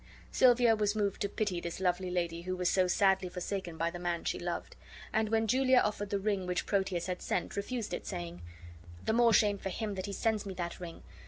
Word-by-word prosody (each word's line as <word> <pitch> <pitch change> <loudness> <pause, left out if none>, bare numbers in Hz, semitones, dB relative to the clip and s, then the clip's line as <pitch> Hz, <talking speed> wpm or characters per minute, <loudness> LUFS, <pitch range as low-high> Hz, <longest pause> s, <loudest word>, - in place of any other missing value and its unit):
Silvia 245 -2 +5
was 210 -1 +1
moved 205 -2 -1
to 200 - 0
pity 200 -4 -1
this 170 +1 -5
lovely 185 0 0
lady 170 -2 -1
who 185 +1 -3
was 180 0 0
so 185 0 +3
sadly 190 -1 +3
forsaken 180 -1 -4
by 165 +1 0
the 175 - -7
man 175 -1 -2
she - - -1
loved; - - -4 0.4
and 220 -1 +1
when 225 0 +2
Julia 260 +3 +4
offered 205 -3 +1
the 200 - 0
ring 195 -2 -1
which 180 0 -1
Proteus 190 -4 0
had 180 0 -3
sent, 180 - -2
refused 220 +2 -3
it, - - -4
saying: 85 0 -5 0.6
"The - - +2
more 235 0 +5
shame 205 -2 +4
for 195 - -4
him 210 +2 -3
that 190 0 -4
he 200 - -4
sends 220 +1 0
me 195 -2 -6
that 175 -1 -4
ring. 170 -2 -8
195 Hz, 225 wpm, -32 LUFS, 180-215 Hz, 0.6 s, Silvia